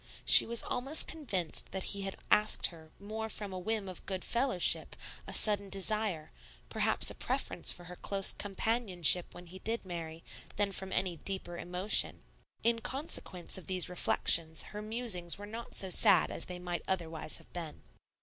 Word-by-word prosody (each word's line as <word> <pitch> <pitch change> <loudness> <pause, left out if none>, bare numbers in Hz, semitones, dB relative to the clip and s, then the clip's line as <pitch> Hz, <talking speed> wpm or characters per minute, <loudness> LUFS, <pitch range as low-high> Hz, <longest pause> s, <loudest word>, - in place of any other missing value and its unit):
She - - +9
was 235 0 -3
almost 270 +5 +3
convinced 195 - -2
that 190 -1 +1
he 200 - -3
had 195 0 -5 0.2
asked 210 +1 +3
her 160 -2 -16
more 220 +2 -7
from 205 -3 -6
a 185 - -6
whim 215 +1 -3
of 185 - -10
good 190 -2 -5
fellowship, 240 -7 +2 0.3
a - - -7
sudden 200 -2 +4
desire, 195 -4 0 0.4
perhaps - - +1
a - - -9
preference - - +4
for 175 - -7
her 180 +1 -11
close 195 +1 +1
companionship 195 -4 0
when 180 - -12
he 185 +2 -12
did 225 +1 -4
marry, 165 -2 -8 0.3
than 205 -1 -1
from 190 0 -5
any 180 -3 -2
deeper 190 -1 -5
emotion. 180 +4 0 0.4
In 230 0 +1
consequence 225 - -4
of - - -15
these 185 -2 +1
reflections 165 -2 +2
her 210 - -7
musings 215 -6 -1
were 205 - -9
not 225 +3 -9
so 190 -1 0
sad 195 -3 +4
as - - -4
they 180 - -8
might 180 -1 -5
otherwise 165 -4 -4
have - - -19
been. 165 -3 -8
190 Hz, 170 wpm, -31 LUFS, 175-215 Hz, 0.4 s, She